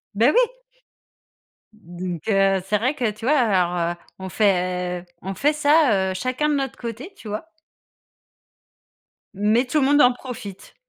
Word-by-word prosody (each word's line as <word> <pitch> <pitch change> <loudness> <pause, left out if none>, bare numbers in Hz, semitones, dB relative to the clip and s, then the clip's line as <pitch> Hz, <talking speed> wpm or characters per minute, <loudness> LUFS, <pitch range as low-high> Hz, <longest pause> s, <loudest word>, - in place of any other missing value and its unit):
Beh 235 +7 +4
oui. - - +4 1.3
Donc 175 -4 -7
heu, 195 -1 +3
c'est 210 +2 +1
vrai 255 +7 0
que 245 -6 -1
tu 215 +2 -9
vois? 295 +3 +3
Alors, 180 -7 +1
heu, - - -14 0.2
on 190 0 -6
fait 180 -3 0 0.2
on 195 +2 -5
fait 290 +10 +1
ça, 285 -11 +3
heu, - - -3
chacun 255 +9 -1
de 295 - +1
notre 270 -2 -3
côté, 240 - -7
tu 225 - -12
vois? 215 +10 -5 1.9
Mais 215 +5 +2
tout 300 +5 0
le - - +3
monde 290 +1 +5
en 250 - +6
profite. 245 -6 -9
215 Hz, 160 wpm, -22 LUFS, 190-265 Hz, 1.9 s, en